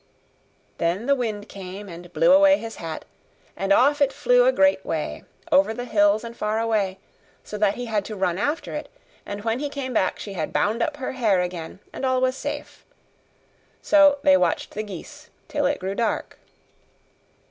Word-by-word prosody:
Then 175 +7 0
the 280 - +4
wind 220 -6 -3
came 195 +1 -8
and 175 -1 -10
blew 260 +2 +4
away 290 0 +6
his 225 -3 -7
hat; 160 -2 -6 0.5
and 195 0 -2
off 285 +8 +4
it 280 -1 +4
flew - - +3
a - - +6
great 285 -10 +3
way, - - -4 0.3
over 280 -6 +4
the 245 - -5
hills 205 -1 +3
and 235 0 -8
far 215 0 -1
away, 210 -4 0 0.5
so - - -8
that 205 -1 +2
he 245 - -5
had 215 -3 -1
to 215 - -6
run 185 -2 0
after 290 +9 -2
it; - - -5 0.4
and 205 0 -6
when 225 +2 0
he 290 0 -2
came 270 -3 -5
back 190 -4 +1
she 200 - -7
had 160 -5 -3
bound 220 +3 +1
up 290 +4 -1
her 265 - -4
hair 220 -8 +2
again, 175 +1 -5
and - - -7
all 260 -1 +2
was 255 0 +1
safe. - - -6 1.0
So 295 -2 +6
they 285 -1 +6
watched 290 +1 0
the 215 - -4
geese 215 - -10 0.2
till 290 -2 0
it 285 +1 -1
grew 190 +1 -3
dark. 230 +2 -2
225 Hz, 190 wpm, -24 LUFS, 200-280 Hz, 1.0 s, away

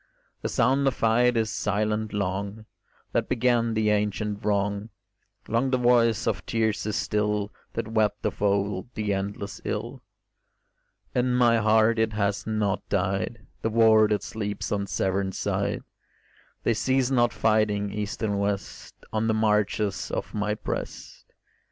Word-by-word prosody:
The - - -2
sound 135 +4 +2
of 130 - +1
fight 120 +2 +3
is 110 -1 +1
silent 105 +1 -1
long 100 +2 -3 0.5
That - - 0
began 120 -2 +2
the 110 -1 +2
ancient 105 0 -1
wrong; 100 +1 0 0.6
Long 115 +4 +1
the 130 - +2
voice 120 -2 +3
of - - -1
tears 110 -2 0
is 110 - -1
still 105 -1 -1 0.2
That - - -3
wept 105 -2 0
of 105 - -2
old 100 0 0
the 105 -2 -1
endless 100 +1 -4
ill. - - -4 1.1
In 125 0 +1
my 120 -2 +4
heart 110 +1 +3
it 110 -1 +1
has 100 -1 -1
not 105 -2 0
died, 95 +4 -1 0.2
The 115 - 0
war 110 -1 +5
that 105 -1 0
sleeps 105 -2 -4
on 100 -1 -1
Severn 95 0 -1
side; - - -1 0.8
They 115 - +3
cease 130 +3 +1
not 120 -2 +3
fighting, 105 -2 +1
east 105 +1 -4
and 100 -2 0
west, 100 -1 -3 0.2
On 110 +1 +1
the 110 - +2
marches 105 -4 +1
of - - -4
my 105 0 -1
breast. 105 - -6
105 Hz, 145 wpm, -26 LUFS, 100-115 Hz, 1.1 s, war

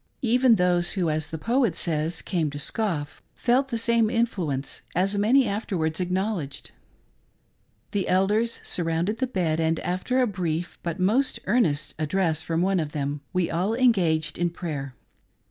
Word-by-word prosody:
Eyen 245 0 +5
those 180 -2 +2
who, 175 -5 0
as 155 0 -2
the 160 - -4
poet 235 - +1
says, 160 0 -1
came 170 -6 0
to 145 - -7
scoff, 150 -3 -2
felt 255 +3 +2
the 240 -4 -2
same 230 -1 +3
influence, 180 - -1
as 190 +3 +1
many 235 +6 +4
afterwards 185 -6 -1
acknowl 185 +2 0
edged. 140 0 -10 1.2
The 200 -2 -1
elders 210 +5 +1
surrounded 170 +5 -1
the 260 - +1
bed, 170 -9 0
and 160 0 +1
after 185 +9 -1
a 255 - +4
brief 175 -5 -3
but 170 0 -3
most 225 +9 +2
earnest 180 -9 +1
address 160 0 +1
from 165 +1 -1
one 190 0 +2
of 150 -2 -3
them, 145 0 -2
we 180 -2 0
all 190 +7 0
engaged 180 -13 +2
in 175 0 +2
prayer. 145 -6 -5
180 Hz, 160 wpm, -25 LUFS, 160-220 Hz, 1.2 s, Eyen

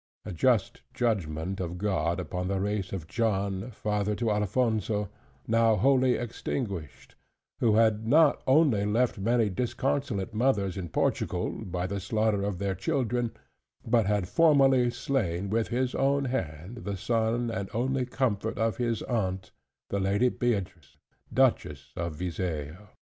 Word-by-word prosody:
A - - -5
just 110 +3 +1
judgment 95 -6 -1
of 90 -1 -4
God 85 -3 0
upon 90 0 -3
the 95 0 -1
race 100 -1 -2
of 95 -5 -4
John, 100 0 -1
father 105 -2 -1
to 115 -1 0
Alphonso, 105 -1 0 0.4
now 115 0 +4
wholly 130 +3 +4
extinguished; 105 - -5 0.5
who 110 -3 +3
had 110 -1 +3
not 155 +4 +5
only 130 -7 +4
left 110 +2 +1
many 115 +2 +2
disconsolate 120 0 -2
mothers 105 -5 +1
in 90 -3 -5
Portugal, - - 0
by 90 -1 -4
the 100 +2 -3
slaughter 105 +1 0
of 100 -2 -2
their 100 +1 -1
children; 120 +4 -1 0.5
but 115 -3 +2
had 100 -3 +1
formerly 135 - +4
slain 100 -7 -2
with 115 0 +1
his 125 +1 -1
own 140 +1 +1
hand, 95 - -4
the 100 -3 -4
son 115 +3 0
and 95 -3 -4
only 130 +2 -1
comfort 125 -5 -1
of 110 +1 0
his 115 -3 -1
aunt 95 -6 -2 0.4
the 100 - 0
Lady 100 +6 +2
Beatrix, 100 -11 -3 0.3
Duchess 75 - +1
of 85 -2 -3
Viseo. 85 +1 -4
105 Hz, 140 wpm, -28 LUFS, 95-120 Hz, 0.5 s, not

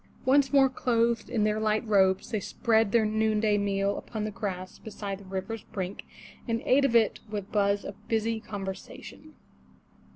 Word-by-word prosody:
Once 270 +1 +4
more 275 -2 +6
clothed 235 -3 0
in 230 -4 0
their 210 0 +1
light 215 +1 0
robes, 190 -3 +3
they 215 - 0
spread 220 +1 +1
their 230 -1 +4
noonday 215 0 +2
meal 200 0 0
upon 215 -2 -5
the 215 - -3
grass 185 -3 -5
beside 200 -2 -6
the 200 - -14
river's 195 +4 -4
brink, 190 0 -5 0.4
and 230 -1 0
ate 275 +2 +4
of 240 -4 +1
it 225 -2 +3
with 205 -2 -5
buzz 200 -1 +1
of - - -10
busy 225 0 0
conversation. 195 -3 -8
215 Hz, 165 wpm, -28 LUFS, 200-230 Hz, 0.4 s, more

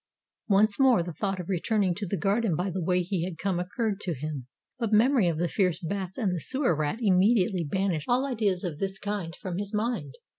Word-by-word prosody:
Once 205 +1 +3
more 255 -9 +5
the 175 0 -6
thought 195 +4 -2
of 175 - -6
returning 195 +1 +1
to 200 +2 -5
the 200 - -1
garden 200 -2 +1
by 185 +4 -1
the 185 +1 -3
way 180 +1 +1
he 180 -1 -2
had 175 -2 -4
come 185 0 -1
occurred 205 +3 -2
to 180 -6 -3
him; 140 -2 -5 0.3
but 230 -3 -1
memory 225 -1 +4
of 165 -2 0
the 175 +2 +1
fierce 180 -1 +1
bats 190 +1 -4
and 205 -7 0
the 175 - -2
Sewer 260 - 0
Rat 150 +5 -1
immediately 195 -2 +3
banished 175 -1 -1
all 250 +3 +3
ideas 215 -8 0
of 165 -5 -4
this 195 0 -2
kind 200 -5 -4
from 185 -1 -5
his 205 +1 -4
mind. 210 - -2
190 Hz, 220 wpm, -27 LUFS, 175-210 Hz, 0.3 s, more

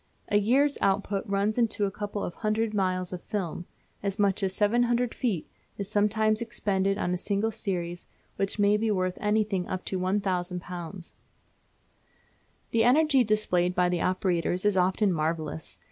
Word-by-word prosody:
A 205 - +4
year's 270 +8 +2
output 195 0 +1
runs 200 +3 0
into 220 -3 +1
a 195 - -2
couple 205 0 -4
of 175 - -4
hundred 215 +1 -1
miles 185 -2 0
of 180 - -5
film. 175 -4 -4 0.3
As 200 0 -2
much 200 -1 +2
as 190 -1 +1
700 240 +3 +2
feet 205 -11 -2 0.3
is 200 - -3
sometimes 215 +1 +2
expended 195 -4 0
on 175 - -1
a 180 - -2
single 205 +3 0
series, 175 -4 -4 0.3
which 195 +1 -1
may 205 0 +4
be 220 +1 0
worth 185 -3 0
anything 210 -3 +1
up 185 - -4
to 190 - -2
£1000. 180 -2 -3 1.6
The 225 -1 +3
energy 275 +2 +5
displayed 180 -5 +1
by 180 0 +3
the 175 -1 0
operators 185 0 0
is 205 -2 +3
often 190 +2 +2
marvellous. 155 - -3
200 Hz, 155 wpm, -27 LUFS, 180-215 Hz, 1.6 s, energy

